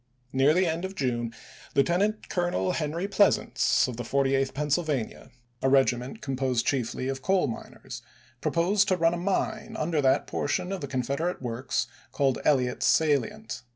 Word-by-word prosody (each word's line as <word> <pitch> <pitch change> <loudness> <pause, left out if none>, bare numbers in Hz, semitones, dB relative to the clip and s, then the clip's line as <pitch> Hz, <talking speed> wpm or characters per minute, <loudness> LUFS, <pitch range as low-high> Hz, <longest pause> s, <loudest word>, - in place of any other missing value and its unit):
Near 135 +4 +4
the 185 +1 +3
end 165 +1 -1
of 190 +1 -5
June 120 -7 -1 0.4
Lieutenant 180 +10 +1
Colonel 175 0 0
Henry 165 +3 -2
Pleasants 200 -8 +3
of 125 -2 -6
the 120 - -3
Forty 135 +2 +1
eighth 135 -1 0
Pennsylvania, 150 -4 -1 0.3
a 135 - +2
regiment 130 -2 +1
composed 130 -3 0
chiefly 130 -1 -1
of 135 0 -3
coal 190 +5 +2
miners, 115 - -7 0.4
proposed 195 +4 +2
to 185 - +2
run 165 0 +3
a - - -2
mine 215 +4 -2
under 155 -3 0
that 130 -1 +3
part 145 - -1
of 185 0 -4
the 140 - -4
Confederate 140 +7 -2
works 120 +2 -2 0.3
called 135 -2 +1
Elliott's 125 -4 +2
salient. 185 +9 +1
145 Hz, 155 wpm, -27 LUFS, 130-180 Hz, 0.4 s, Near